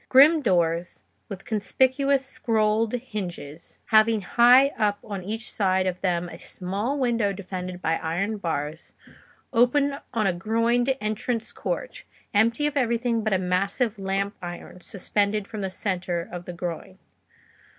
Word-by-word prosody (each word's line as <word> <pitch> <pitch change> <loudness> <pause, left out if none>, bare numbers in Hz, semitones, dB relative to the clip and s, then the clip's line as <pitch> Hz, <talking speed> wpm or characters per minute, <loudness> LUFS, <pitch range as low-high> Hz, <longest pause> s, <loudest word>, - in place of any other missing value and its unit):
Grim 300 +5 +7
doors, 175 - 0 0.3
with 195 -2 -8
conspicuous 260 +5 +1
scrolled 220 -3 +1
hinges, 185 - -6
having 220 0 +5
high 245 +7 +6
up 210 -6 0
on 200 -4 -6
each 220 +4 -4
side 190 -2 +1
of 185 -1 -2
them 175 -2 0
a - - -10
small 205 +10 -3
window 235 -6 +1
defended 185 -2 -6
by 165 0 +1
iron 195 +7 -2
bars, 160 -3 -4 0.6
opened 280 +4 +2
on 225 -4 0
a 190 - +2
groined 230 +7 +1
entrance 220 +2 -2
court, - - -4 0.3
empty 230 +7 +3
of 295 -1 -1
everything 235 -3 +1
but 215 - 0
a 190 - +3
massive 195 +5 0
lamp 195 +1 -1
iron 175 +1 -8
suspended 200 +2 -1
from 215 -2 -6
the 190 - -2
centre 180 -3 -2
of 175 0 -7
the 180 - -6
groin. 175 +2 -6
210 Hz, 140 wpm, -25 LUFS, 185-235 Hz, 0.6 s, Grim